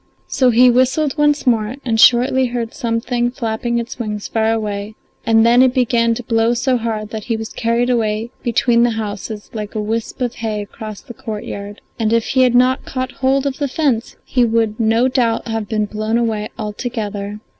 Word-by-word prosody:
So 260 -2 +2
he 245 +2 +6
whistled 260 +4 +2
once 295 -1 +2
more, 230 -1 +1
and 225 -3 0
shortly 255 +3 +5
heard 235 -1 -4
something 240 0 -1
flapping 235 0 -2
its 235 +1 -5
wings 210 -3 -4
far 225 0 +1
away, 210 -1 -3 0.3
and 225 0 +5
then 240 +2 +5
it 260 0 +4
began 235 -2 +2
to 245 - -6
blow 225 +1 +1
so 255 +1 +1
hard 220 -2 -3
that 215 -2 -5
he 230 -2 -1
was 220 0 -6
carried 235 +1 0
away 225 -1 -1
between 235 0 +2
the 240 - +4
houses 210 0 -5
like 210 -2 -6
a - - -1
wisp 220 +4 -3
of 245 -2 -1
hay 215 -2 -3
across 215 0 -9
the 250 - -11
courtyard, 205 -2 -7 0.2
and 225 0 +1
if 230 -1 +2
he 260 - +3
had 250 -1 +4
not 255 +2 +3
caught 255 0 -4
hold 270 0 0
of 275 -1 -2
the 285 - 0
fence 265 -5 -1
he 250 - +1
would 225 -1 +1
no 225 +2 +3
doubt 245 -3 0
have 225 -2 -3
been 215 -1 0
blown 215 +2 -2
away 220 -3 -1
altogether. 210 -2 -4
230 Hz, 195 wpm, -18 LUFS, 220-250 Hz, 0.3 s, he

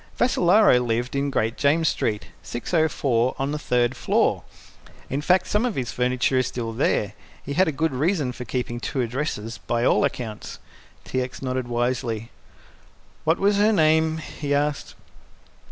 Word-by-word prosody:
Vassalaro 205 - +4
lived 120 +2 -1
in 140 +1 0
Great 115 -3 -1
James 160 +3 +2
Street, 105 -6 -1
604, 130 -3 0
on 135 +1 -1
the 150 - -3
third 125 -2 +1
floor. - - +1 0.7
In 140 +2 -1
fact, 180 +4 +3
some 210 +2 0
of 245 -4 -1
his 125 -3 -2
furniture 125 +1 +1
is 130 - 0
there 115 -2 -4
still. 105 -4 0 0.3
He 140 - -4
had 185 +5 +3
a - - +1
good 160 +2 0
reason 150 0 0
for 125 - -7
keeping 120 0 -3
two 130 +2 -2
addresses 115 -4 -3
by 120 +3 -1
all - - +3
accounts." 125 -6 -4 0.5
T. 130 - -2
X. 125 +1 -6
nodded 130 -1 -2
wisely. 120 -2 -2 0.9
"What 160 +2 +3
was 200 +1 +2
her 210 +2 +4
name?" 160 -3 +3
he 145 -2 -3
asked. 145 0 -1
130 Hz, 160 wpm, -24 LUFS, 120-160 Hz, 0.9 s, Vassalaro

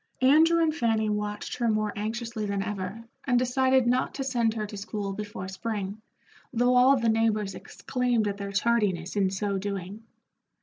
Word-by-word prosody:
Andrew 325 +5 +5
and 310 -1 +1
Fanny 220 -5 +1
watched 210 0 -3
her 240 -2 +1
more 215 -1 0
anxiously 220 +1 -3
than 200 -1 -1
ever, 200 +2 -5 0.2
and 250 -2 +3
decided 260 +1 +3
not 250 +2 +1
to 275 - -2
send 235 -4 0
her 215 -1 -2
to 210 - -8
school 205 -1 -4
before 205 -2 -6
spring, 200 +1 -4 0.5
though 245 +1 +2
all 260 +2 +6
the 235 -2 0
neighbors 220 -3 +1
exclaimed 245 +1 -1
at 200 -1 -2
their 200 0 -5
tardiness 200 -5 0
in 195 -2 +2
so 195 +1 -2
doing. 200 +1 -5
215 Hz, 170 wpm, -27 LUFS, 200-245 Hz, 0.5 s, all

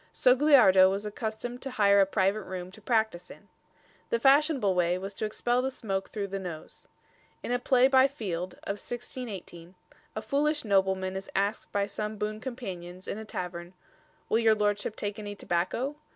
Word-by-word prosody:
Sogliardo 250 -8 +6
was 200 +2 -2
accustomed 220 +3 -5
to 270 - -5
hire 200 -5 +4
a 195 - +4
private 195 +1 +1
room 185 -1 -7
to 215 - -14
practise 220 -6 0
in. - - -14 0.6
The 470 - +1
fashionable 275 -7 +4
way 180 0 +1
was 195 +2 -6
to 215 - -3
expel 240 +3 0
the 265 - -1
smoke 195 -7 -4
through 200 -2 -4
the 195 +1 -3
nose. 175 -4 -8 0.6
In - - -4
a 245 - +1
play 255 0 +4
by 265 0 +5
Field 185 -10 -5
of 200 +1 -4
1618, 195 -8 -7 0.4
a - - -3
foolish 295 0 0
nobleman 190 -2 +1
is 190 0 -6
asked 200 +3 -1
by 200 -1 +1
some 210 +1 -5
boon 215 +1 -3
companions 185 -8 -7
in 210 - -4
a 220 - -7
tavern: 175 -2 -6 0.5
"Will 225 - +2
your 225 -1 +4
lordship 205 0 0
take 205 0 -4
any 205 -1 -6
tobacco?" 200 +11 -1
205 Hz, 175 wpm, -28 LUFS, 190-245 Hz, 0.6 s, Sogliardo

